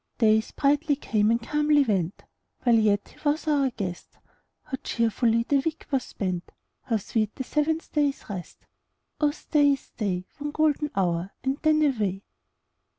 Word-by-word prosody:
Days 220 -1 +3
brightly 290 +1 +2
came 215 -6 +1
and 230 +1 +3
calmly 295 +3 +3
went, 195 -7 -1 0.4
While 240 -2 +5
yet 205 -2 +2
he - - -20
was 300 +2 0
our 285 -3 +3
guest; 190 -7 -6 0.5
How 275 -3 -5
cheerfully 230 0 +1
the 280 - +3
week 320 +3 -3
was 265 -3 +1
spent! 185 -3 -4 0.3
How 230 -3 0
sweet 215 +1 -2
the 265 - -4
seventh 315 +4 -1
day's 290 -2 0
rest! 185 -4 -8 0.5
Oh 300 - +4
stay, 290 -1 +2
oh - - +2
stay. 195 -8 -4
One 295 +1 -3
golden 300 0 +1
hour, 175 -1 0
and 270 +1 -1
then 310 0 +4
away. 210 -9 0
255 Hz, 155 wpm, -26 LUFS, 210-295 Hz, 0.5 s, While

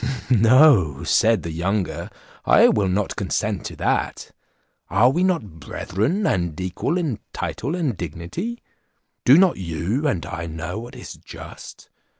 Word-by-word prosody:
"No," 115 - +5
said 110 -3 +3
the 85 - -4
younger 90 +3 -2 0.3
"I - - +6
will 100 -2 +1
not 95 +2 -1
consent - - -2
to - - -6
that; - - -2 0.6
are 110 +8 +4
we 175 +6 0
not 125 - -1
brethren, 110 - -2
and 85 - -1
equal 95 - -2
in 155 - -2
title 140 +8 -3
and 155 - -1
dignity? 90 - -6 0.6
Do 135 +4 +8
not 185 -1 +4
you 95 - -2
and 95 - -1
I 85 -1 -5
know 80 +5 -5
what 120 +2 -10
is - - -9
just? - - -11
105 Hz, 145 wpm, -22 LUFS, 85-145 Hz, 0.6 s, Do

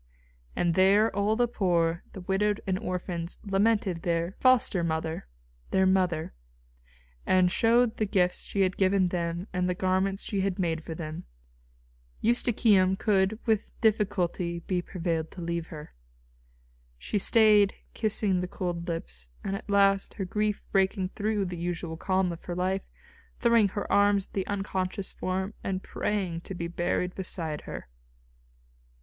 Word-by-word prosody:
And 175 -1 +1
there 200 +5 +4
all 205 +2 +2
the 240 +1 +2
poor, 170 -6 +1
the 190 - -8
widowed 200 +3 0
and 190 -1 0
orphans 180 -4 -4
lamented 200 -3 +1
"their 170 0 0
foster 250 -8 +3
mother," 160 - -2 0.4
"their 190 0 +3
mother," 185 -4 +1 0.9
and 185 -1 +3
showed 235 +3 +3
the 215 - 0
gifts 180 -2 +1
she 200 - -1
had 185 -1 +1
given 190 -1 +3
them 175 +1 -3
and 180 0 0
the 180 - 0
garments 190 +2 0
she 200 -2 -1
had 190 -1 -1
made 165 -4 -1
for 160 - -6
them. 155 -1 -6 0.9
Eustochium 215 -5 +3
could 195 0 +1
with 220 -3 -1
difficulty 190 -6 0
be 180 +1 -1
prevailed 165 -3 -3
to 180 - -10
leave 170 0 -3
her. 150 -3 -10 1.0
She 205 - -2
stayed 210 -1 +5 0.2
kissing 210 -4 +1
the 180 - -3
cold 175 -2 -4
lips, 60 - -5
and 195 - -2
at 200 - -8
last, 195 -1 +3
her 195 - -3
grief 210 +2 -1
breaking 190 -1 +1
through 210 0 -1
the 180 -1 -5
usual 170 -1 -3
calm 185 +1 0
of 170 - -9
her 175 - -4
life, 185 +2 -1 0.5
throwing 235 -3 +4
her 200 +1 -4
arms 200 -1 +4
about - - -27
the 190 -2 -2
unconscious 195 -1 -2
form 190 +2 -3
and 190 -1 -2
praying 185 -5 -2
to 190 - -7
be 170 -1 -3
buried 175 +1 -1
beside 165 -5 -2
her. - - -7
190 Hz, 150 wpm, -28 LUFS, 175-205 Hz, 1.0 s, stayed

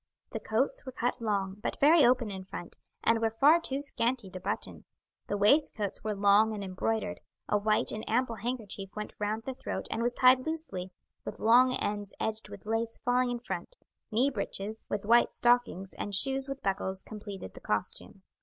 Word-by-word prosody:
The - - -3
coats - - 0
were 260 - -7
cut 245 0 -2
long, 200 -3 -1
but - - -3
very 305 +2 +7
open 240 -3 +3
in 190 -1 -6
front, 175 -2 -8 0.2
and 230 0 +3
were 225 - +3
far 285 +9 +5
too 275 -3 -3
scanty 240 -6 0
to 185 - -6
button; - - -4 0.4
the 205 - -1
waistcoats 210 -1 +2
were 215 -1 -1
long 205 +2 +4
and 200 - -5
embroidered; 205 +2 -2 0.3
a 210 - +2
white 215 +1 +1
and 215 - -4
ample 235 0 +1
handkerchief 220 -5 -4
went 210 0 -5
round 215 +2 -1
the 265 - -4
throat - - -5
and 225 - -1
was 240 +1 0
tied 255 +2 +5
loosely, 310 - -3 0.3
with - - -6
long 250 +3 +5
ends 205 -1 -3
edged 220 0 -3
with - - -11
lace 225 +1 -1
falling 250 0 +1
in 245 - -1
front; 245 - -6 0.3
knee 250 +6 +3
breeches, 210 -1 -5
with 205 0 -2
white 235 +3 +5
stockings, 240 -6 +2
and 205 - -2
shoes 270 +5 +1
with 275 0 -6
buckles, 190 -1 -1
completed 205 - -8
the - - -12
costume. - - -3
225 Hz, 185 wpm, -30 LUFS, 205-250 Hz, 0.4 s, very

